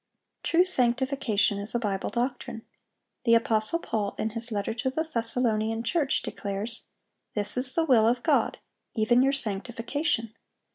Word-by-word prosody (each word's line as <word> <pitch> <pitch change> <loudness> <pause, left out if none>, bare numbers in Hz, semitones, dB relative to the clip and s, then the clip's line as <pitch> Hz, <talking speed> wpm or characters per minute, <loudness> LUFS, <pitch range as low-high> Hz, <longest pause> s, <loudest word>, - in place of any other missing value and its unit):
True 340 +2 +3
sanctification 250 - +1
is 205 +3 -5
a - - +2
Bible 200 -4 -2
doctrine. 240 -2 -4 0.6
The 230 -1 +4
apostle 225 +5 +1
Paul, 215 -11 -3
in 220 - -2
his 230 +2 -4
letter 205 0 -2
to 260 +3 -2
the 315 +5 -2
Thessalonian 230 -5 -1
church, 285 +3 0
declares, 205 +3 -5 0.5
"This 205 -1 +8
is 255 +1 0
the 330 - +2
will 235 -7 +4
of 240 +1 0
God, - - +1 0.4
even 240 +2 +3
your 270 +1 +3
sanctification." 235 +2 -2
230 Hz, 145 wpm, -27 LUFS, 215-260 Hz, 0.6 s, This